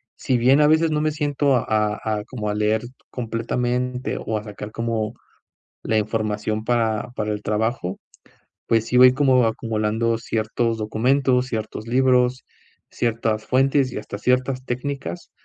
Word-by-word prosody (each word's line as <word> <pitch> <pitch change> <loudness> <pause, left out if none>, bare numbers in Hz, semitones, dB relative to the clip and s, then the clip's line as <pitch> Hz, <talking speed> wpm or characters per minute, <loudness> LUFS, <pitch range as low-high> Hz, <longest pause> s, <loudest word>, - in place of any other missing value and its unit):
si 125 - 0
bien 130 +5 +4
a 150 - +5
veces 160 +1 +3
no 150 0 +1
me 155 0 +1
siento 145 -2 +1
a - - -2
a 105 0 0
a - - -6
como 110 -5 -4
a 105 - -1
leer 105 +2 +1 0.3
completamente, 125 +2 -2
o 110 0 -2
a 105 - -5
sacar 105 0 -8
como 115 -1 -2 0.7
la 110 - +1
información 110 0 -1
para 115 -1 0
para 105 0 -2
el 105 - -6
trabajo, 105 -3 -1 0.7
pues, 115 -1 +2
sí 125 - +1
voy 125 0 +8
como 130 -3 +4
acumulando 110 +1 -1
ciertos 115 0 -1
documentos, 125 +4 +1
ciertos 110 -1 -5
libros, 125 0 +2 0.5
ciertas 115 -2 -1
fuentes 135 0 +2
y - - -6
hasta 100 - -6
ciertas 130 +1 0
técnicas 125 - -4
115 Hz, 150 wpm, -22 LUFS, 110-130 Hz, 0.7 s, voy